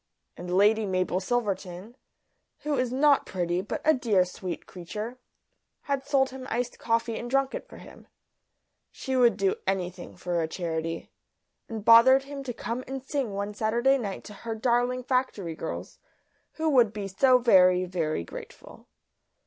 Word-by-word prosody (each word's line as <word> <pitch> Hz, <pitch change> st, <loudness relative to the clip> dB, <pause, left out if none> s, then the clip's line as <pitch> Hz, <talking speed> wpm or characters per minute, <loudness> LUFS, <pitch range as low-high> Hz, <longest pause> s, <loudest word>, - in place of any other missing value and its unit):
And 180 Hz, 0 st, -7 dB
Lady 210 Hz, +2 st, +4 dB
Mabel 185 Hz, -1 st, 0 dB
Silverton, 200 Hz, -1 st, -3 dB, 0.7 s
who 300 Hz, -1 st, -1 dB
is 255 Hz, -2 st, 0 dB
not 280 Hz, +2 st, +3 dB
pretty 175 Hz, -1 st, -1 dB
but 200 Hz, -, -5 dB
a 315 Hz, -, +6 dB
dear 215 Hz, -9 st, +2 dB
sweet 180 Hz, -1 st, -6 dB
creature, 210 Hz, +7 st, -7 dB, 0.6 s
had 280 Hz, -2 st, -2 dB
sold 270 Hz, -1 st, +2 dB
him 260 Hz, 0 st, -8 dB
iced 245 Hz, +1 st, -3 dB
coffee 230 Hz, 0 st, 0 dB
and 240 Hz, -, -6 dB
drunk 275 Hz, +1 st, +1 dB
it -, -, -6 dB
for -, -, -13 dB
him -, -, -14 dB, 0.8 s
she 265 Hz, -, -4 dB
would 245 Hz, -2 st, +4 dB
do 195 Hz, -2 st, +1 dB
anything 185 Hz, -2 st, -3 dB
for 175 Hz, -1 st, -1 dB
a 160 Hz, -, -1 dB
charity 165 Hz, -1 st, -4 dB, 0.6 s
and 220 Hz, -2 st, -6 dB
bothered 255 Hz, +4 st, +7 dB
him 280 Hz, 0 st, -7 dB
to 250 Hz, -, -3 dB
come 240 Hz, +1 st, -4 dB
and 265 Hz, 0 st, -5 dB
sing 270 Hz, -6 st, -2 dB
one 200 Hz, +1 st, -3 dB
Saturday 235 Hz, +6 st, +2 dB
night 200 Hz, -5 st, -5 dB
to 210 Hz, -, -10 dB
her 225 Hz, +2 st, -6 dB
darling 245 Hz, +2 st, +1 dB
factory 250 Hz, -9 st, -1 dB
girls, 160 Hz, -, -6 dB, 0.5 s
who 320 Hz, 0 st, -2 dB
would 245 Hz, -8 st, +4 dB
be 205 Hz, -2 st, -4 dB
so 250 Hz, +7 st, +4 dB
very, 185 Hz, -6 st, +5 dB
very 165 Hz, -, -2 dB
grateful. -, -, -11 dB
225 Hz, 160 wpm, -27 LUFS, 185-255 Hz, 0.8 s, bothered